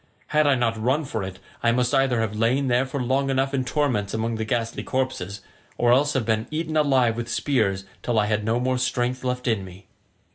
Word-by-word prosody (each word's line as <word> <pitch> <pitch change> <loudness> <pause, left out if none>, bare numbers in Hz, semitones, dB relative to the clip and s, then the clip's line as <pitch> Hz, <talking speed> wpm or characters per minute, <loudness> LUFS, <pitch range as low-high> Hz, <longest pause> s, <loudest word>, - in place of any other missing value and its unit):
Had 150 -1 +3
I 140 - +5
not 115 -3 0
run 135 +7 +1
for 110 -5 -3
it 95 -1 -6 0.2
I 115 - +3
must 125 +2 +1
either 135 -4 +3
have 110 -1 -2
lain 125 +5 +1
there 125 +2 +2
for 140 +2 -4
long 135 +2 0
enough 135 +1 0
in 130 -2 +1
torments 125 -8 0
among 115 +1 -1
the 110 0 -2
ghastly 115 0 -2
corpses, 115 -7 -3 0.4
or 120 0 +4
have 135 -3 +1
been 110 0 0
eaten 155 0 -3
alive 135 -6 +3
with 120 0 -4
spears 110 -7 0 0.2
till 120 -2 -1
I 105 - +4
had 105 0 0
no 115 +3 +1
more 130 0 0
strength 125 0 -1
left 125 0 -2
in 110 -5 +1
me." 95 0 -12
120 Hz, 215 wpm, -24 LUFS, 110-130 Hz, 0.4 s, I